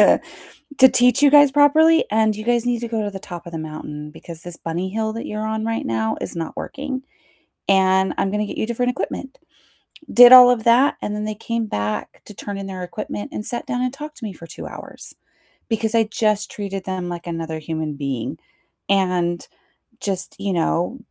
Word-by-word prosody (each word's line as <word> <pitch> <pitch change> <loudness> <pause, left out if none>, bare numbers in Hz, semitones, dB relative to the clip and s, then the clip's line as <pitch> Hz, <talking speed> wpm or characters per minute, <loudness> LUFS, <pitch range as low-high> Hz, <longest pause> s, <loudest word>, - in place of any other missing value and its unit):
to - - +6 0.6
to 260 -1 +8
teach 250 +2 +3
you 290 - +7
guys 290 -1 +7
properly, 315 +3 +5
and 220 0 +2
you 215 - -6
guys 240 +1 +1
need 245 -1 0
to 235 - -4
go 225 -2 -2
to 205 - -3
the 195 - -7
top 175 -2 -9
of 170 - -9
the 165 - -5
mountain 150 -1 -7
because 165 +1 -11
this 175 0 -9
bunny 175 +3 -3
hill 220 +1 -2
that 230 - -5
you're 215 +1 -4
on 220 0 -2
right 225 0 -2
now 110 -1 -1
is - - -5
not 165 -1 -5
working, 270 -2 -5 0.6
and 190 -1 +3
I'm 195 - 0
gonna 210 0 -1
get - - -7
you - - 0
different 245 +2 0
equipment," 265 +2 -5 0.8
did 245 0 +9
all 250 -1 +11
of 240 -3 +1
that, 245 +5 +4
and 210 - -3
then 210 - -3
they 215 0 -3
came 230 +1 -3
back 105 - -4
to 210 - -11
turn 200 0 -6
in 195 - -6
their 185 -2 -6
equipment 105 - -6
and 210 - -5
sat 240 - -4
down 245 0 -2
and 255 0 -1
talked 300 +2 -9
to 235 - -8
me 210 - -4
for 170 -2 -12
2 - - -9
hours - - -10 0.6
because 225 0 -1
I 230 - +5
just 215 -1 0
treated 195 -2 -5
them 185 -2 -4
like 175 0 -6
another 165 -1 -4
human 155 -1 -4
being, 135 -5 -4 0.5
and 180 -3 +1 0.6
just, 190 -2 -3
you 200 -1 -2
know, 175 +6 0
210 Hz, 210 wpm, -21 LUFS, 175-235 Hz, 0.8 s, all